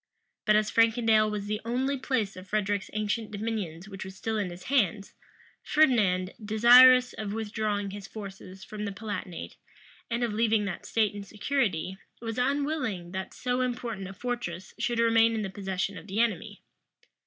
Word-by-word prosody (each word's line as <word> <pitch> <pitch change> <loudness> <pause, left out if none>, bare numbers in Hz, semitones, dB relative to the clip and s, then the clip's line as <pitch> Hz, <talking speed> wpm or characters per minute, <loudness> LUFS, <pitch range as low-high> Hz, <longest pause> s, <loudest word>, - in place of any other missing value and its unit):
But 215 - +5
as 215 0 +2
Frankendale 225 -1 +4
was 210 -1 -3
the 210 +1 -3
only 255 +4 0
place 255 -6 -1
of 185 +1 -10
Frederic's 205 -1 -1
ancient 215 +1 -1
dominions 205 -5 -4
which 195 -2 -7
was 190 0 -9
still 220 +3 -3
in 200 -3 -1
his 175 +1 -10
hands, 205 -7 +1 0.5
Ferdinand, 205 -11 +3
desirous 245 +4 +7
of 210 -2 -4
withdrawing 210 -2 -2
his 200 0 -8
forces 195 -2 -9
from 210 +1 -6
the 200 - -3
Palatinate, 195 - -6 0.5
and 235 +1 -1
of 230 -3 0
leaving 220 -1 +2
that 190 -3 -5
state 215 -2 +1
in 205 -1 -6
security 200 - -1 0.2
was 225 +1 -4
unwilling 260 - -1
that 190 0 -4
so 250 0 -1
important 240 -6 -3
a 195 - -8
fortress 195 -6 -5
should 240 - 0
remain 230 0 +4
in 220 - -1
the 195 - -4
possession 195 0 -3
of - - -15
the 200 +2 -2
enemy. 225 -7 -1
215 Hz, 165 wpm, -28 LUFS, 195-230 Hz, 0.5 s, desirous